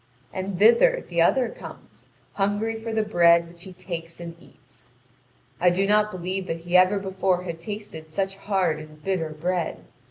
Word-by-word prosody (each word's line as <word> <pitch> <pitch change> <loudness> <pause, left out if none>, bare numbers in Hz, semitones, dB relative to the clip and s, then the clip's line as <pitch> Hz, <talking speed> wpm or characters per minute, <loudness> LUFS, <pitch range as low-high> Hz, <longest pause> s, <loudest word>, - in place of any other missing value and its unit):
And 190 0 -4
thither 235 - +5
the 170 -1 0
other 245 +9 +3
comes, - - -12 0.3
hungry 205 +3 0
for 225 +1 -5
the 220 -1 +1
bread 170 -4 +4
which 170 0 -14
he 190 - -10
takes 170 -2 -7
and 170 -1 -7
eats. - - -18 0.7
I 180 - +5
do 185 +3 +1
not 210 +1 +3
believe 185 0 -4
that 165 0 -4
he 175 +1 -3
ever 185 +2 +6
before 190 -2 -1
had 170 -2 -6
tasted 205 -5 -7
such 195 +4 -2
hard 190 -6 0
and 155 0 -13
bitter 180 -4 -1
bread. 170 +2 -2
185 Hz, 170 wpm, -25 LUFS, 170-205 Hz, 0.7 s, ever